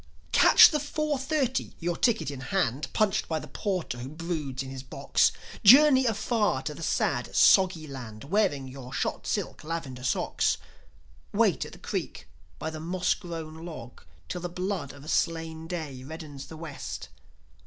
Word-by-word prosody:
Catch - - +8
the 300 - +1
four 300 0 -1
thirty; 265 -2 -1
your 175 0 -1
ticket 225 - +1
in 140 - -7
hand, 135 -1 -1
Punched 215 -1 +1
by 160 - -1
the 150 - -6
porter 180 - -3
who 125 +2 -6
broods 155 -4 -4
in 130 - -8
his 135 -1 -6
box; 130 - +1 0.3
Journey 265 +3 +8
afar 215 - +1
to 150 - -3
the 150 - -10
sad, - - 0
soggy 185 -5 +5
land, 120 -7 -8
Wearing 145 -5 +1
your 130 -1 -9
shot - - -2
silk - - -2
lavender 145 -6 -5
socks. 130 - +1 0.7
Wait - - +2
at - - -10
the - - -11
creek - - -5 0.3
by 160 - -4
the 160 - -6
moss 175 +3 0
grown 165 -3 -7
log 155 -8 -9 0.3
Till 180 - -4
the 175 - -3
blood 180 -5 -3
of 140 +1 -13
a - - -12
slain 160 -1 -1
day 155 -7 -5
reddens 145 -1 -8
the 160 - -10
West. 155 -3 -7
160 Hz, 165 wpm, -28 LUFS, 140-195 Hz, 0.7 s, Catch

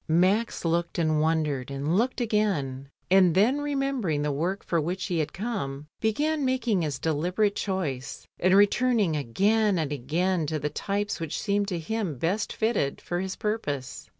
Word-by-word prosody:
Max 185 +7 +2
looked 170 +1 0
and 155 -2 +2
wondered 155 -5 0
and 140 +4 -1
looked 245 +7 +1
again, 180 - 0 0.2
and 185 -3 +5
then 245 +9 +3
remembering 275 - -1
the 150 - 0
work 175 +8 -2
for 170 -2 0
which 180 +4 -2
he 175 -4 -1
had 155 -1 -1
come, 175 - -4
began 295 +8 0
making 245 -7 +1
his 150 -5 -2
deliberate 180 +8 0
choice, 145 -10 -3
and 185 +1 +4
re 205 +1 +8
turning 220 -6 +1
again 200 - +2
and 155 -3 -1
again 160 +5 0
to 155 - -1
the 150 0 -3
types 205 +5 -2
which 165 -2 -3
seemed 200 0 0
to 185 -4 -2
him 175 - -3
best 185 - -1
fitted 220 -11 0
for 175 - -3
his 190 +1 -3
purpose. 150 - -3
180 Hz, 170 wpm, -27 LUFS, 150-210 Hz, 0.2 s, re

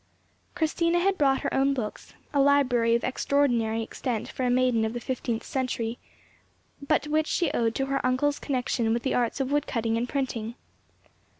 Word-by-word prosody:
Christina 335 +1 +1
had 385 +2 +2
brought 275 -5 +2
her - - -2
own 275 +1 +2
books—a 250 +4 -5
library 255 -5 +3
of 235 - -1
extraordinary 240 -5 +1
extent 230 0 -3
for 260 - -4
a 250 - +2
maiden 245 -2 +2
of 220 0 -1
the 240 - -3
fifteenth 235 -2 -3
century, 245 -3 -2 0.8
but 285 0 +1
which 310 +1 +1
she 340 -5 +1
owed 230 -1 0
to 270 - 0
her 275 0 -1
uncle's 255 +3 +1
connexion 250 -4 0
with 235 - -3
the 265 - 0
arts 245 +3 0
of 270 0 -1
wood 290 0 +1
cutting 225 -2 0
and 240 +1 -2
printing. 240 -5 -3
255 Hz, 175 wpm, -27 LUFS, 235-280 Hz, 0.8 s, library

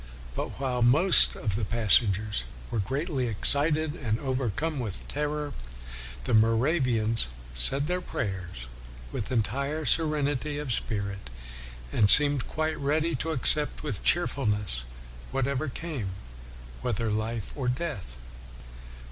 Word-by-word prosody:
But - - -5
while 130 -3 -1
most 150 +11 +6
of 105 -5 -2
the 110 - -2
passengers 105 - +1 0.3
were 115 - -1
greatly 135 - -2
ex 105 - +4
cited 150 +1 +3
and 115 -8 -2
overcome 135 +3 -2
with 110 -6 -5
terror, 150 0 -3 0.7
the - - -2
Mo 110 +1 +4
ravians 120 - +1 0.3
said 65 - +4
their 180 +3 -1
prayers 90 - -5 0.5
with 110 - -4
entire 140 +6 -1
serenity 150 -2 +1
of 145 -4 -1
spirit 100 - -3 0.6
and 105 -2 +3
seemed 145 -1 +6
quite 155 0 -2
ready 155 +4 0
to 155 +6 -3
accept, 150 0 +2
with 150 - -3
cheerfulness, 105 - +1 0.5
whatever 140 +2 -1
came, 140 - -5 0.7
whether 115 -2 -1
life 110 0 -3
or 135 -4 -3
death. 125 - -3
130 Hz, 120 wpm, -27 LUFS, 110-150 Hz, 0.7 s, most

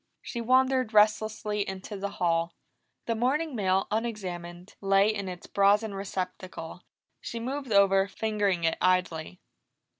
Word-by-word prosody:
She 235 - -5
wandered 255 -1 +2
restlessly 210 0 +2
into 190 +2 -6
the 200 0 -3
hall. 170 -1 0 0.5
The 230 - 0
morning 265 +6 0
mail, 190 -2 +1
unexamined, 185 -5 -4
lay 195 +2 +4
in 200 -3 -4
its 180 -1 -8
brazen 205 +2 +2
receptacle, 185 -3 -5 0.4
she 235 - -6
moved 265 +1 -4
over, 195 -1 +5
fingering 205 -4 -1
it 165 - +1
idly. 180 -2 0
200 Hz, 125 wpm, -28 LUFS, 185-220 Hz, 0.5 s, over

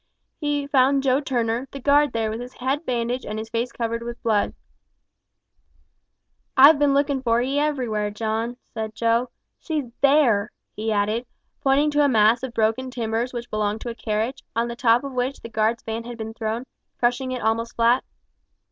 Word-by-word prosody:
He 290 -2 -1
found 275 0 +3
Joe 265 +1 +3
Turner, 240 -2 -1
the 275 - -8
guard, 290 +2 +4
there, 225 -1 -1
with 220 - -4
his 250 +1 -9
head 270 +5 -2
bandaged 245 +1 -1
and 215 - -5
his 220 +1 -6
face 235 +1 -1
covered 230 0 -3
with 235 0 -6
blood. 215 -3 +1 2.0
"I've 285 +3 +8
bin 285 -1 +3
lookin' 280 -1 +1
for 235 -2 +2
'ee 270 +4 0
everywhere, 245 -9 0
John," 225 +3 -3 0.2
said 220 -1 -4
Joe. 230 +2 +1 0.3
"She's 300 -7 -3
there!" 270 -8 +4 0.2
he 220 +1 -2
added, 215 +4 0 0.3
pointing 280 +2 +3
to 295 0 +3
a 285 - +4
mass 220 0 +4
of 260 -2 -4
broken 225 +4 +1
timbers 235 0 -2
which 240 -1 -6
belonged 215 0 -1
to 240 - -4
a - - -6
carriage, 225 +4 -2
on 230 +1 +1
the 235 - -5
top 240 0 +3
of 275 - -5
which 255 +2 -2
the 230 - -8
guard's 220 +1 0
van 225 +1 -4
had 240 -1 -7
been 220 0 -6
thrown, 225 +1 -3 0.3
crushing 245 +2 0
it 250 -3 -4
almost 230 +1 0
flat. 235 +2 +3
240 Hz, 185 wpm, -23 LUFS, 225-265 Hz, 2.0 s, I've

